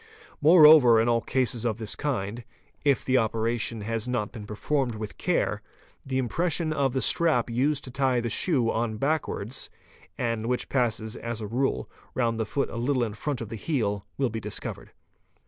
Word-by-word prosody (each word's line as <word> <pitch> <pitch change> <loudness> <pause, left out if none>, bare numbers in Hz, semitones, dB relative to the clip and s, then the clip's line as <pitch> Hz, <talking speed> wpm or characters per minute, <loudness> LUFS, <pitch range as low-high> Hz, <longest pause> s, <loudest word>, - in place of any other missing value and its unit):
Moreover 150 -7 +8
in 115 - +2
all 115 -1 +2
cases 125 -2 -1
of 115 -3 -1
this 110 -2 -2
kind, 120 -5 -3 0.4
if 140 -3 +2
the 130 0 +3
operation 115 0 -1
has 115 +2 -3
not 120 -4 -2
been 110 -4 -9
performed 125 +3 -1
with 110 -1 -7
care, - - 0 0.4
the 130 -1 -3
impression 155 - 0
of 135 -4 0
the 130 - 0
strap 140 -9 +2
used 140 +4 0
to 130 - -8
tie 130 -1 +1
the 120 - -2
shoe 125 -2 +2
on 110 -1 -2
backward, 135 -4 -2 0.6
and 115 -2 -2
which 125 0 -2
passes 110 -4 -1
as 115 -1 -5
a 110 - -5
rule 125 +6 -1 0.3
round 115 -2 0
the 110 - -1
foot 140 - -2
a - - -6
little 125 +1 +1
in 110 -3 -3
front 135 +4 -3
of 115 - -6
the 115 - -5
heel, 105 -6 -1
will 135 -3 0
be 110 - -3
discovered. 105 -1 -6
120 Hz, 180 wpm, -26 LUFS, 110-135 Hz, 0.6 s, Moreover